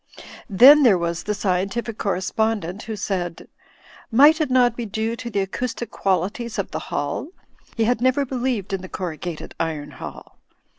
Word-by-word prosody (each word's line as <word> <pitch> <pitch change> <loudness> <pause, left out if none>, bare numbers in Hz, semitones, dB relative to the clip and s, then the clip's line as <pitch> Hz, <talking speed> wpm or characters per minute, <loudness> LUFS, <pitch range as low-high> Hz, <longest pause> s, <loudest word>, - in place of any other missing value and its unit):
Then 265 +9 +8
there 230 -9 +6
was 170 0 -2
the 210 - -2
scientific 200 +4 -2
correspctfident 200 0 -1
who 220 - -5
said 185 -4 -3 0.3
— - - -23
^Might 295 +7 +6
it 305 - 0
not 250 -2 +3
be 240 - -4
due 220 +2 -2
to 245 -1 -6
the 205 -3 0
acoustic 235 +4 -4
qualities 195 +5 -1
of - - -3
the - - -3
hall? - - -2 0.5
He 225 - +2
had 240 +1 +1
never 255 +2 +2
believed 245 -6 -2
in 190 - -2
the 185 - -9
corrugated 175 -2 -5
iron 150 -3 -3
hall. - - -10
215 Hz, 165 wpm, -22 LUFS, 185-240 Hz, 0.5 s, Then